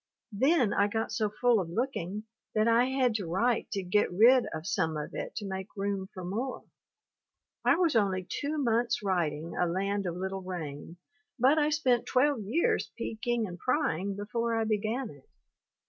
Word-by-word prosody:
Then 250 0 +3
I 200 - +3
got 220 +2 -2
so 215 -2 0
full 235 +2 +2
of 175 -3 -3
looking 210 -2 -2 0.3
that 215 +1 +3
I 230 +2 +5
had 260 -2 +1
to 195 -5 -5
write 225 +8 +1
to 195 -2 -2
get 185 +3 +2
rid 235 +7 +6
of 160 0 -6
some 160 -3 0
of 150 - -5
it - - -5
to 210 - -4
make 190 +1 -6
room 195 -1 -2
for 185 -3 -8
more. 230 +8 -3 1.0
I - - +5
was 335 -5 +2
only 190 -4 +2
two 295 +2 -3
months 235 -5 +1
writing 165 -4 -1
"A 180 - +1
Land 195 +3 -1
of 170 - -3
Little 190 +1 -3
Rain" 170 -3 -6 0.4
but 270 +5 +4
I 300 0 +3
spent 265 -6 +1
12 270 -1 +2
years 300 +12 +1
peeking 230 +1 -2
and 175 -3 -8
prying 200 - 0
before 230 +3 -2
I 225 - +1
began 220 +3 -1
it. 140 -2 -18
210 Hz, 180 wpm, -29 LUFS, 185-245 Hz, 1.0 s, rid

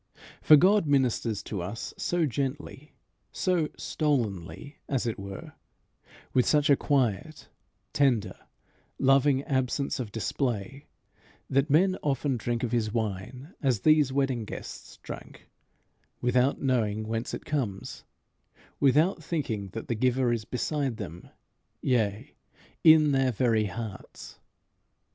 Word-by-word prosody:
For 155 - +8
God 190 +3 +4
ministers 125 -6 +1
to 100 -4 -4
us 100 +6 -5
so 175 -2 0
gently, 140 +2 -4 0.4
so 180 -4 0
stolenly, 125 - -2
as 135 -4 0
it 115 -3 -3
were, 100 -1 -8 0.8
with 125 - +3
such 145 -1 +3
a - - +7
quiet, 140 +2 -1 0.4
tender, 120 -9 +2 0.6
loving 135 0 +3
absence 130 0 -1
of 115 -5 -4
display, 120 +3 -3 0.6
that 135 +2 +2
men 185 +6 +3
often 140 -1 0
drink 120 +1 -2
of 120 - -1
his 115 -3 0
wine, 115 - -4
as 130 -8 +1
these 155 -3 +4
wedding 135 -3 0
guests 105 - -9
drank, - - -10 0.7
without 125 +2 +2
knowing 110 -5 0
whence 115 +1 -3
it - - -10
comes 120 -11 -3 0.8
without 155 +5 +3
thinking 120 - -3
that 115 - -6
the - - 0
giver 125 +1 +1
is 110 -2 -3
beside 135 -1 -2
them, 90 -5 -8 0.5
yea, 110 -5 -1 0.5
in 155 -2 +7
their 135 -1 +2
very 115 -2 +1
hearts. 105 0 -8
130 Hz, 120 wpm, -28 LUFS, 110-145 Hz, 0.8 s, For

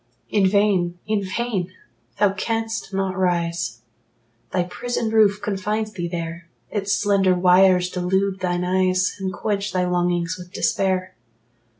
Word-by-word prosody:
In 200 -3 +4
vain 190 -3 +2
in 215 -1 0
vain! 190 -2 -2 0.5
Thou 200 -2 +3
canst 225 +1 -3
not 190 -1 -1
rise: 170 -2 -1 0.7
Thy 180 - +1
prison 225 +5 -3
roof 210 -2 +4
confines 210 +2 -2
thee 175 -3 -3
there; 170 0 -5 0.2
Its 200 -2 -2
slender 195 -3 +3
wires 180 0 +5
delude 190 +2 0
thine 180 -1 -1
eyes, 185 0 +1
And 190 -1 -2
quench 200 +3 -2
thy 180 -1 +1
longings 175 0 0
with 180 0 -11
despair. 185 -2 0
185 Hz, 130 wpm, -22 LUFS, 180-205 Hz, 0.7 s, wires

